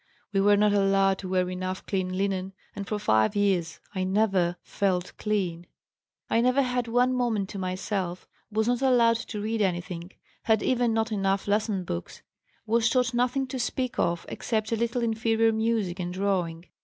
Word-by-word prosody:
We 195 Hz, -, +3 dB
were 205 Hz, +1 st, +5 dB
not 210 Hz, 0 st, +3 dB
allowed 195 Hz, -1 st, +3 dB
to 185 Hz, -, -6 dB
wear 185 Hz, -1 st, +1 dB
enough 185 Hz, +1 st, -4 dB
clean 185 Hz, -2 st, -2 dB
linen, 195 Hz, -1 st, -1 dB, 0.2 s
and 200 Hz, -1 st, -5 dB
for 210 Hz, -, -1 dB
five 110 Hz, -, +2 dB
years 190 Hz, -5 st, +1 dB
I 185 Hz, -2 st, -1 dB
never 190 Hz, -3 st, +2 dB
felt 185 Hz, -3 st, -1 dB
clean. 180 Hz, -5 st, -1 dB, 0.6 s
"I 230 Hz, -, +2 dB
never 255 Hz, +3 st, +3 dB
had 250 Hz, -1 st, -1 dB
one 245 Hz, +2 st, +2 dB
moment 230 Hz, -6 st, 0 dB
to 200 Hz, -, -6 dB
myself, 185 Hz, -1 st, -3 dB, 0.2 s
was 220 Hz, +1 st, +1 dB
not 245 Hz, +1 st, +1 dB
allowed 240 Hz, -3 st, +4 dB
to 215 Hz, -1 st, -6 dB
read 220 Hz, +1 st, -1 dB
anything, 175 Hz, -2 st, -2 dB, 0.3 s
had 220 Hz, -2 st, +3 dB
even 245 Hz, -2 st, +2 dB
not 225 Hz, +1 st, 0 dB
enough 195 Hz, -1 st, 0 dB
lesson 205 Hz, -2 st, 0 dB
books, 85 Hz, -, -6 dB, 0.4 s
was 230 Hz, +1 st, +2 dB
taught 250 Hz, 0 st, +1 dB
nothing 250 Hz, +3 st, +1 dB
to 260 Hz, -, -4 dB
speak 250 Hz, +1 st, -2 dB
of 170 Hz, 0 st, 0 dB
except 220 Hz, -1 st, -2 dB
a -, -, +2 dB
little 235 Hz, +2 st, -1 dB
inferior 225 Hz, 0 st, +2 dB
music 220 Hz, -5 st, 0 dB
and 175 Hz, -1 st, -3 dB
drawing. 180 Hz, -3 st, -1 dB
205 Hz, 175 wpm, -27 LUFS, 185-230 Hz, 0.6 s, were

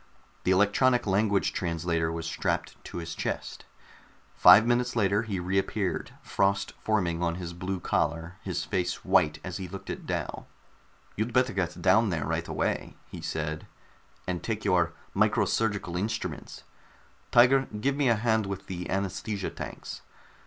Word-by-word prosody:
The -, -, +2 dB
electronic 105 Hz, +6 st, +3 dB
language 100 Hz, 0 st, +2 dB
translator 85 Hz, -1 st, -1 dB
was 85 Hz, 0 st, -4 dB
strapped 85 Hz, -, -2 dB
to -, -, -7 dB
his 85 Hz, -1 st, -5 dB
chest. -, -, -4 dB, 0.7 s
Five 110 Hz, -, +8 dB
minutes 120 Hz, +1 st, +1 dB
later 105 Hz, -2 st, +2 dB
he 105 Hz, -5 st, -3 dB
reappeared, 95 Hz, +2 st, -1 dB
frost 100 Hz, 0 st, 0 dB
forming 90 Hz, -6 st, 0 dB
on 85 Hz, -1 st, 0 dB
his 85 Hz, -1 st, -6 dB
blue 90 Hz, +2 st, -3 dB
collar, 85 Hz, +1 st, -1 dB
his -, -, -3 dB
face 90 Hz, -2 st, -2 dB
white 75 Hz, -1 st, +3 dB
as 90 Hz, -2 st, -5 dB
he 95 Hz, -2 st, -5 dB
looked 95 Hz, +2 st, -7 dB
at -, -, -7 dB
Dal. -, -, -3 dB, 0.7 s
"You'd 110 Hz, +3 st, -2 dB
better 125 Hz, -1 st, +3 dB
get 90 Hz, -3 st, -2 dB
down 105 Hz, +4 st, +5 dB
there 80 Hz, -5 st, -1 dB
right 80 Hz, +2 st, -2 dB
away," -, -, -2 dB, 0.2 s
he -, -, -7 dB
said, 80 Hz, 0 st, -3 dB, 0.6 s
"and 90 Hz, -2 st, -2 dB
take 110 Hz, -2 st, -3 dB
your 90 Hz, -3 st, +3 dB, 0.2 s
micro -, -, +3 dB
surgical 105 Hz, -6 st, -1 dB
instruments. 105 Hz, +5 st, -4 dB, 0.7 s
Tiger, 130 Hz, +3 st, +5 dB
give 135 Hz, +5 st, +1 dB
me 140 Hz, -3 st, +2 dB
a 115 Hz, -, +5 dB
hand 110 Hz, -1 st, +1 dB
with 100 Hz, -1 st, -5 dB
the 90 Hz, -1 st, -5 dB
anaesthesia 95 Hz, +1 st, -2 dB
tanks. -, -, -7 dB
95 Hz, 150 wpm, -28 LUFS, 85-110 Hz, 0.7 s, Five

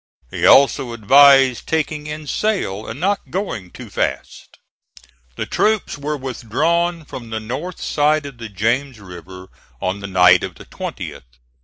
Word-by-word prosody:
He -, -, +1 dB
also 135 Hz, -2 st, +5 dB
advised 135 Hz, +3 st, +5 dB
taking 155 Hz, -1 st, -2 dB
in 150 Hz, 0 st, -6 dB
sail, 145 Hz, -, -2 dB
and 115 Hz, -, -7 dB
not 200 Hz, +4 st, -1 dB
going 125 Hz, -, -4 dB
too -, -, -11 dB
fast. -, -, -4 dB, 0.8 s
The -, -, -3 dB
troops 215 Hz, -1 st, 0 dB
were 150 Hz, +1 st, -4 dB
withdrawn 155 Hz, +7 st, -1 dB
from 120 Hz, -4 st, -9 dB
the 110 Hz, 0 st, -3 dB
north 130 Hz, +11 st, -6 dB
side 150 Hz, 0 st, +1 dB
of 135 Hz, -4 st, -10 dB
the 115 Hz, -2 st, -7 dB
James 120 Hz, +6 st, -1 dB
River 95 Hz, 0 st, -11 dB, 0.3 s
on 95 Hz, +2 st, -2 dB
the 100 Hz, -, -6 dB
night 90 Hz, -2 st, +5 dB
of -, -, -5 dB
the -, -, -13 dB
20th. -, -, -8 dB
135 Hz, 150 wpm, -19 LUFS, 105-155 Hz, 0.8 s, also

